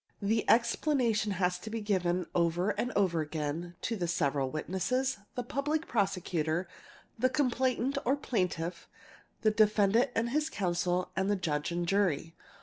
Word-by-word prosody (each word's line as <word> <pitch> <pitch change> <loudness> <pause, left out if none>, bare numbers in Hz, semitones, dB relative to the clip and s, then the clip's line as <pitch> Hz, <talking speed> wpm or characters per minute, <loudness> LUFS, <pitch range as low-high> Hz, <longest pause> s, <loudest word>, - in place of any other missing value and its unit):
The 220 +2 0
explanation 235 -3 +2
has 180 -1 0
to 220 - -7
be 225 +1 -3
given 185 -4 0
over 175 +3 +2
and 245 - -2
over 180 -5 +2
again; 155 +3 -4
to 230 - -1
the 175 -5 -2
several 140 -5 0
witnesses, 200 - -1 0.2
the 245 - -2
Public 295 +6 -1
Prosecutor, 180 -5 0 0.5
the 255 +2 +3
complainant 260 0 +1
or 265 +4 +2
Plaintiff, 180 - -2 0.5
the 215 - +4
defendant 215 +2 +4
and 235 +1 0
his 305 +3 +1
counsel, 180 - -1
and 190 +1 0
the 205 - +3
Judge 155 -5 -2
and 175 0 -1
jury. 175 -5 +1
200 Hz, 145 wpm, -31 LUFS, 175-235 Hz, 0.5 s, the